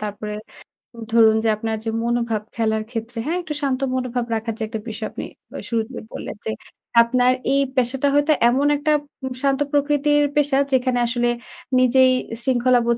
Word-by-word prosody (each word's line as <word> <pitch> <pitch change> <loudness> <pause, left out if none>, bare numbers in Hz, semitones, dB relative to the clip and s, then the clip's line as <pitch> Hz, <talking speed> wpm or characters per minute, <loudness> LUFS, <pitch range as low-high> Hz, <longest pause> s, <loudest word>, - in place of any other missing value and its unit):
তারপরে 210 0 -5 0.8
ধরুন 220 -1 +6
যে 225 - +2
আপনার 220 0 -2
যে - - 0
মনোভাব 235 -2 0
খেলার 220 -1 0
ক্ষেত্রে, 230 0 -5
হ্যাঁ? 345 +3 0
একটু 310 -3 -5
শান্ত 270 -2 0 0.2
মনোভাব 250 -1 -2
রাখার 225 0 -3
যে 220 - -3
একটা 220 0 -5
বিষয় 215 0 -4
আপনি - - -6 0.3
আ - - -4
শুরুতেই 230 +1 -3
বললেন - - -6
যে, 220 - -1 0.5
আপনার 250 +1 +3 0.2
এই 275 - +3
পেশাটা 260 +2 +1
হয়তো 290 +2 +3 0.2
এমন 275 +4 +2
একটা 305 +1 0 0.3
উম 260 - -3
শান্ত 275 0 +2
প্রকৃতির 290 0 +2
পেশা। 290 -2 +2 0.2
যেখানে 250 -1 +2
আসলে 240 0 0 0.5
নিজেই 255 +1 +5 0.3
শৃঙ্খলাবোধ 245 -2 +2
245 Hz, 160 wpm, -21 LUFS, 225-270 Hz, 0.8 s, ধরুন